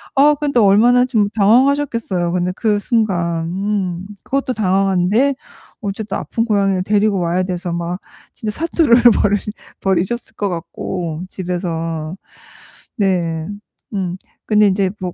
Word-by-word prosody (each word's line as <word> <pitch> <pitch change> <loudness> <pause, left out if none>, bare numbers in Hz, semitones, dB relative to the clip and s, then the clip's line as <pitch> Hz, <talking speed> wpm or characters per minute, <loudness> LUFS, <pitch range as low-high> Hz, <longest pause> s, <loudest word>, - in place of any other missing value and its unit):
아 290 +2 +6
근데 290 -1 -1
또 230 -4 +5
얼마나 245 +5 +5
좀 220 -6 +1
당황하셨겠어요 230 -5 +2
근데 180 0 0
그 210 -3 +1
순간. 175 -8 0
음. 190 -1 -2 0.2
그것도 270 -2 -1
당황한데 195 +6 +2 0.5
어쨌든 205 0 -3
아픈 230 0 -2
고양이를 195 -4 +1
데리고 205 -1 +2
와야 175 +2 0
돼서 180 -2 -3
막 170 +2 -3 0.3
진짜 215 -1 -4
사투를 320 -6 +3 0.3
벌 205 0 +3 0.5
벌이셨을 190 +5 -1
것 205 - -1
같고 170 -1 -4
집에서. 165 -3 -3 0.8
네. 170 -5 0 0.5
음 185 -3 -2 0.3
근데 210 -1 +4
인제 190 -1 +1
뭐 180 -1 -3
195 Hz, 270 characters per minute, -18 LUFS, 175-220 Hz, 0.8 s, 아